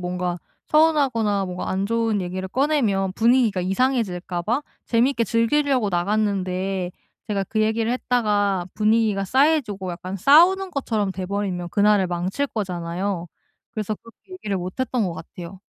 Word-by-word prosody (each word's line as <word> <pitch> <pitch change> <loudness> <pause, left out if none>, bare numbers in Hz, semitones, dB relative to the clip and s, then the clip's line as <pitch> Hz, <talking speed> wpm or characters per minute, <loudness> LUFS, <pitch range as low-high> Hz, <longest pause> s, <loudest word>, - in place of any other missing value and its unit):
뭔가 180 0 -3 0.3
서운하거나 270 -10 +2
뭔가 180 0 -5
안 195 +1 -1
좋은 225 -2 0
얘기를 185 +1 -4
꺼내면 225 -8 +1
분위기가 230 -3 +3
이상해질까 190 -4 -1
봐 240 +10 0 0.2
재밌게 235 0 +2
즐기려고 250 +2 +1
나갔는데 190 -1 -1 0.3
제가 200 -2 -1
그 215 +3 -2
얘기를 220 +1 0
했다가 205 -7 0
분위기가 215 -2 +2
싸해지고 250 - +1
약간 185 +2 -6
싸우는 350 - +5
것처럼 220 - -1
돼버리면 185 -2 -3
그날을 205 -1 +3
망칠 180 +10 -2
거잖아요. 180 -4 -3 0.5
그래서 215 -2 -3
그렇게 230 - -18
얘기를 210 - -3
못 180 0 -6
했던 250 -3 0
것 175 -3 -3
같아요. 180 +3 -10
205 Hz, 355 characters per minute, -23 LUFS, 185-235 Hz, 0.5 s, 싸우는